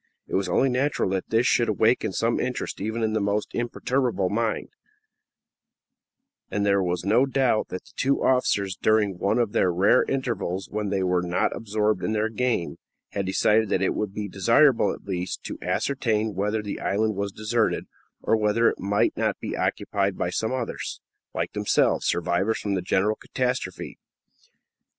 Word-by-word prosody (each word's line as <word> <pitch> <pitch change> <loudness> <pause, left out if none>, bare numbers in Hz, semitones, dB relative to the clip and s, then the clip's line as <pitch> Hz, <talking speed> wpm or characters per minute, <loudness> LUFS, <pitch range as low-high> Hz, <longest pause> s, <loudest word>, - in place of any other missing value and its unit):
It - - -12
was 95 -1 0
only 130 +9 +3
natural 130 -5 0
that 95 -1 -2
this 115 +2 +2
should 120 -2 +3
awaken 110 0 +2
some 115 +4 0
interest 125 -5 -3
even 110 +3 -2
in 110 -1 0
the 110 - +1
most 100 +1 -1
imperturbable 120 -4 -1
minds, 110 +1 -1 1.8
and 100 0 -1
there 100 -1 +3
was 90 -1 -2
no 115 +7 +4
doubt 130 -5 +1
that 90 - -6
the - - -19
two 140 +1 +1
officers, 100 -7 +2
during 105 -4 +1
one 100 - +1
of 120 -4 +1
the 95 - +2
rare 95 +8 +4
intervals 115 -8 -2
when 105 -1 -2
they 95 -1 0
were 90 -1 +1
not 90 0 0
absorbed 105 -3 -1
in 110 - 0
their 110 +1 0
game, 115 -6 -1 0.3
had 100 -2 -3
decided 105 +3 +2
that 95 - +1
it - - +1
would 105 -2 -2
be 105 0 -4
desirable 115 +8 +4
at - - -8
least 90 -2 -4
to - - -6
ascertain 110 -6 0
whether 105 +3 -1
the 100 - -5
island 110 +1 0
was 100 +1 -2
deserted, 110 +2 0 0.4
or - - +3
whether 110 +2 +2
it - - 0
might 100 +1 +1
not - - -1
be - - -4
occupied 100 -1 -1
by 90 - -1
some 110 +5 -1
others, 130 -3 -4 0.4
like - - -2
themselves, - - +1
survivors 90 +5 +1
from 100 - -2
the 95 - 0
general 95 +4 +1
catastrophe. 125 -8 -3
105 Hz, 175 wpm, -25 LUFS, 95-115 Hz, 1.8 s, no